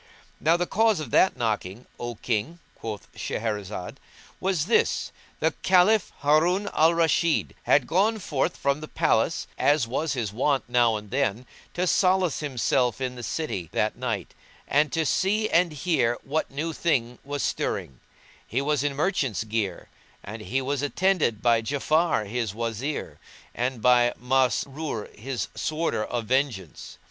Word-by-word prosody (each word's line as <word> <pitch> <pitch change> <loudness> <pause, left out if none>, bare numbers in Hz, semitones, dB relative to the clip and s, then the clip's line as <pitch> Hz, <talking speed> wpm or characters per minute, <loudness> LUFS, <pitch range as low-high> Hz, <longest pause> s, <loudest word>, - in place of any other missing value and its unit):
Now 165 +2 +3
the 175 - 0
cause 220 0 +2
of 145 -7 -6
that 190 - +4
knocking, 110 -1 -2
O 120 0 -4
King 120 +9 -2 0.2
(quoth 110 -2 -7
Shahrazad) 105 -4 -4 0.4
was 185 -5 0
this, 230 - +1 0.3
the - - +2
Caliph, 190 +3 +4
Harun 170 +7 +3
al 165 +2 +4
Rashid, 165 0 +2
had 135 -3 +4
gone 200 - +2
forth 150 -9 -1
from 140 +1 0
the 155 - -6
palace, - - +1
as 145 -4 +3
was 150 +6 -1
his 115 -6 -3
wont 135 +4 +1
now 120 -2 +3
and 105 -1 -7
then, 130 -3 0 0.3
to 180 - +1
solace 185 -2 +2
himself 130 -3 0
in 130 -1 -2
the 125 - -8
city 110 - -3
that 105 - 0
night, 115 -7 -3 0.3
and 150 +2 +2
to 160 -1 0
see 210 +8 +1
and 170 0 +3
hear 145 -6 +1
what 155 +3 -1
new 155 +4 -3
thing 125 -8 0
was 145 0 -3
stirring; 65 - -2 0.5
he 120 - -1
was 145 0 0
in 145 -1 -1
merchant's 140 - 0
gear, 105 -5 -3 0.4
and 110 +2 -7
he 130 +5 -2
was 140 +1 -1
attended 150 - +1
by 115 -2 +4
Ja'afar, 145 -1 +1
his 110 -2 -2
Wazir, 115 +6 -4 0.3
and 125 -1 -2
by 120 -1 +4
Masrur 130 0 -1
his 125 +2 -4
Sworder 155 -8 -1
of 120 0 -3
Vengeance. 120 - -2
135 Hz, 150 wpm, -26 LUFS, 115-160 Hz, 0.5 s, that